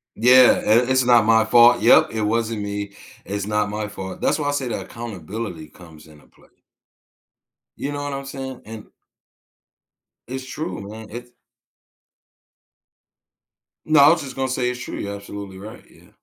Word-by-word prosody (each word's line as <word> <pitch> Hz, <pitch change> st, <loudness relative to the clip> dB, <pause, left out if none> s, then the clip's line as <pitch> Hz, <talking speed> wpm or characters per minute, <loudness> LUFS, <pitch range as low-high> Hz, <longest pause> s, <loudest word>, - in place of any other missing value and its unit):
Yeah, 125 Hz, +2 st, +6 dB
"I 120 Hz, +4 st, +3 dB
it's 130 Hz, 0 st, +3 dB
not 120 Hz, -3 st, +5 dB
my 110 Hz, 0 st, +4 dB
fault 120 Hz, +1 st, +5 dB
Yep, 115 Hz, -, +5 dB
it 110 Hz, -1 st, -3 dB
wasn't 110 Hz, 0 st, -1 dB
me, 100 Hz, 0 st, -5 dB, 0.3 s
it's 100 Hz, 0 st, -4 dB
not 105 Hz, 0 st, -1 dB
my 105 Hz, 0 st, -4 dB
fault." 95 Hz, -2 st, -8 dB
That's -, -, +1 dB
why 145 Hz, -1 st, -1 dB
I -, -, +1 dB
say 140 Hz, -3 st, -2 dB
that -, -, -4 dB
accountability 105 Hz, -6 st, -7 dB
comes 80 Hz, 0 st, -16 dB
into 75 Hz, -1 st, -18 dB
play. -, -, -25 dB, 1.3 s
You 140 Hz, -, -4 dB
know 145 Hz, 0 st, -5 dB
what 145 Hz, 0 st, -4 dB
I'm 140 Hz, 0 st, -6 dB
saying? 135 Hz, -1 st, -7 dB
And 110 Hz, -1 st, -10 dB, 1.4 s
It's 130 Hz, +2 st, -6 dB
true, 130 Hz, -, -6 dB
man, 110 Hz, +1 st, -10 dB
it's 120 Hz, +2 st, -9 dB, 2.5 s
No, 155 Hz, -1 st, +4 dB
I 140 Hz, -, +8 dB
was 165 Hz, 0 st, +2 dB
just 135 Hz, -3 st, -8 dB
gonna 135 Hz, 0 st, -1 dB
say 130 Hz, -1 st, -1 dB
it's 125 Hz, 0 st, -5 dB
true, -, -, -6 dB
you're 100 Hz, 0 st, -5 dB
absolutely 100 Hz, -1 st, -9 dB
right, 105 Hz, +3 st, -11 dB
yeah. -, -, -21 dB
115 Hz, 165 wpm, -21 LUFS, 100-130 Hz, 2.5 s, I